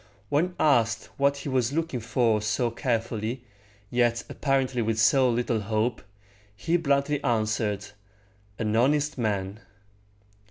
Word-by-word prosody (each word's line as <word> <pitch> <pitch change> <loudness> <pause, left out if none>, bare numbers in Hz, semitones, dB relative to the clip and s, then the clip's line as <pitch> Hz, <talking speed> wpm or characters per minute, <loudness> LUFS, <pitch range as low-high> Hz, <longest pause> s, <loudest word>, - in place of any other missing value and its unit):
When 175 +5 +1
asked 115 -7 +2
what 140 0 +2
he 140 - -5
was 130 -1 0
looking 160 -5 -1
for 115 -1 +1
so 110 +3 0
carefully, 115 -1 -2 0.5
yet 120 -1 +1
apparently 135 -3 0
with 110 0 -1
so 130 +3 +4
little 120 -1 0
hope, 110 +3 -1 0.5
he 165 +11 -1
bluntly 140 -3 +1
answered, 110 -3 0 0.7
"An 110 -1 -1
honest 145 +4 +2
man." 100 -2 -2
120 Hz, 120 wpm, -26 LUFS, 110-140 Hz, 0.7 s, so